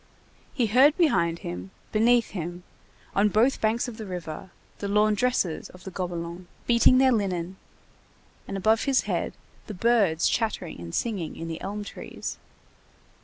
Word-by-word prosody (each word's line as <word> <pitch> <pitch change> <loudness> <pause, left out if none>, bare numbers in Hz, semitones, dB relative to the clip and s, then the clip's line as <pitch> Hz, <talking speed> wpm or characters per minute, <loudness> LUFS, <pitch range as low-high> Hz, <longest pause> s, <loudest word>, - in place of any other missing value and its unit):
He 250 -5 +1
heard 260 +8 +5
behind 170 - +3
him, 90 +2 -5 0.2
beneath 230 +2 +3
him, 175 -1 -5 0.5
on 205 +1 +3
both 230 +7 +2
banks 225 +3 +1
of 235 -3 -7
the 220 -3 -7
river, 175 -1 -6 0.3
the 200 - -3
laundresses 210 -2 +1
of 185 - -15
the 190 - -7
Gobelins 175 -1 -5 0.2
beating 240 +2 +5
their 260 0 +5
linen, 190 -5 -1 0.9
and 195 - -4
above 220 +3 +2
his 275 -2 +3
head, - - -2 0.3
the 210 - -6
birds 200 -6 +3
chattering 215 - -1
and 85 -1 -6
singing 200 -9 -2
in 165 - -6
the 165 -1 -5
elm 205 +2 -4
trees. - - -7
205 Hz, 150 wpm, -26 LUFS, 175-235 Hz, 0.9 s, heard